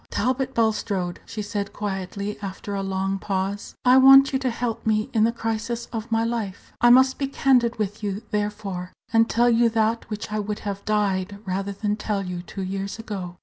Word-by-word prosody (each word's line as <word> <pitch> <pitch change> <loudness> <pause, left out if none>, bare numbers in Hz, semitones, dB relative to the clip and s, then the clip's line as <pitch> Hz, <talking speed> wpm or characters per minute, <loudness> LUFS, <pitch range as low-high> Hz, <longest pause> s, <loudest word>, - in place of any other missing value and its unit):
"Talbot 260 +3 -1
Bulstrode," 210 -5 0
she 215 -2 -5
said, 205 -1 -4
quietly, 200 0 -4
after 200 +1 -6
a 200 - -1
long 195 0 -1
pause, 195 +1 -3
"I 250 +1 +7
want 270 +1 +8
you 265 - +2
to 260 -1 0
help 230 -1 -3
me 215 -1 0
in 220 -1 +4
the 230 - +2
crisis 230 +1 -3
of 225 +1 -5
my 225 0 +2
life. 230 -5 -4
I 240 - +6
must 260 +3 +6
be 275 - 0
candid 250 -4 +2
with 210 0 -3
you, 205 +1 -3
therefore, 205 -3 -3 0.2
and 225 0 +4
tell 240 +1 +3
you 235 0 +4
that 225 0 0
which 210 0 -5
I 215 - -1
would 210 0 -3
have 200 -1 -4
died 200 -2 0
rather 195 +1 -2
than 210 +1 -2
tell 205 -2 -2
you 180 -1 -4
two 190 +2 -7
years 195 +2 -4
ago. 195 -6 -6
210 Hz, 195 wpm, -24 LUFS, 195-230 Hz, 0.2 s, want